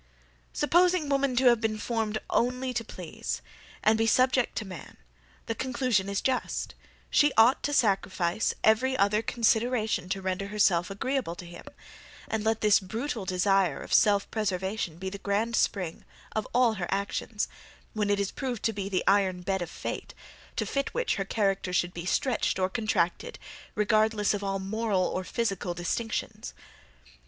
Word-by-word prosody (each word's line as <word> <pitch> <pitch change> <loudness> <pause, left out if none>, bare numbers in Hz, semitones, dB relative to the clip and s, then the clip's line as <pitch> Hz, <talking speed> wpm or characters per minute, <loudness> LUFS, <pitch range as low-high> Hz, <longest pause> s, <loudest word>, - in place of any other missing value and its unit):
Supposing 345 0 +3
women 275 -2 +1
to 255 +2 +2
have 240 -2 +5
been 220 -1 0
formed 220 -1 -1
only 250 +1 0
to 240 -2 -1
please, - - -6 0.4
and 220 +1 +4
be 225 - +2
subject 255 +1 +3
to 220 - -3
man, 185 -3 -10 0.5
the 225 - -2
conclusion 240 -5 0
is 200 - -1
just, 260 -1 -1 0.4
she 295 0 +5
ought 230 +4 +6
to 290 - -1
sacrifice 195 -5 +1
every 255 +5 +3
other 205 +2 +3
consideration 225 -4 +1
to 195 - -1
render 190 +1 -2
herself 200 -4 +2
agreeable 235 -1 -2
to 175 - -9
him: 175 - -11 0.6
and 220 -1 -2
let 220 0 +1
this 210 -1 +5
brutal 220 +3 -4
desire 185 -3 +2
of - - -6
self 205 -2 +4
preservation 190 -4 -2
be 190 +1 -5
the 200 - -7
grand 210 +4 0
spring 180 -8 0 0.3
of 215 - -2
all 245 -2 +4
her 175 - -1
actions, 200 +2 -2 0.5
when 210 -2 -1
it 205 0 +2
is 200 -1 -1
proved 250 -5 -4
to 225 - +1
be 200 -1 -4
the 185 -2 0
iron 190 -2 +3
bed 190 0 -1
of 175 - -4
fate, - - -6 0.4
to - - -1
fit 275 0 -2
which, - - 0
her 195 - -1
character 195 -3 0
should 180 0 0
be 170 +1 -6
stretched 245 0 +1
or 185 0 +1
contracted, 215 - -1 0.4
regardless 215 0 +2
of 205 -1 -3
all 195 0 -1
moral 200 0 0
or 185 +1 -2
physical 195 -4 -2
distinctions. 175 - -3
210 Hz, 165 wpm, -28 LUFS, 190-235 Hz, 0.6 s, ought